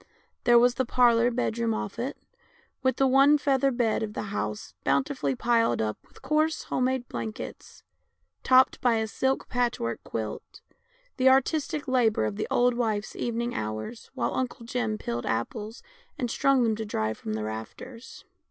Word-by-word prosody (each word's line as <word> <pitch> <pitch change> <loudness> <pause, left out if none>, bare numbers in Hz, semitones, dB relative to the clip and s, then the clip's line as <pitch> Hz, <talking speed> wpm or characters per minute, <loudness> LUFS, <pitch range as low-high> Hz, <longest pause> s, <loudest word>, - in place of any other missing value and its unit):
There 240 0 +7
was 245 +1 +5
the 260 - 0
parlour 240 -1 +4
bedroom 230 -2 -1
off 205 +2 -5
it, 255 +4 -3 0.6
with 260 0 +2
the 270 - +3
one 275 +3 +6
feather 275 -1 +2
bed 240 -4 0
of 215 -1 -3
the - - -3
house 105 - -4
bountifully 140 0 0
piled 230 - +2
up 110 -1 -2
with - - -20
coarse 310 +1 +1
home 255 - -1
made 260 -1 -1
blankets, 220 -1 -7 0.6
topped 260 0 +4
by 245 -2 +3
a 220 0 0
silk 265 +4 -1
patchwork 240 - -1
quilt, 110 -1 -6 0.6
the 260 0 +5
artistic 290 +3 +1
labour 235 - +2
of 105 -2 -2
the - - -3
old 245 0 +3
wife's 220 -3 -2
evening 235 0 -2
hours 110 - -5
while - - -1
Uncle 255 -2 -3
Jim 230 -3 -2
peeled 120 - -4
apples 210 - -3 0.3
and 245 -2 -2
strung 275 -2 +3
them 225 -2 +2
to 220 - -3
dry 110 - -1
from 110 0 -6
the 110 0 -3
rafters. 110 - -8
235 Hz, 165 wpm, -27 LUFS, 210-255 Hz, 0.6 s, There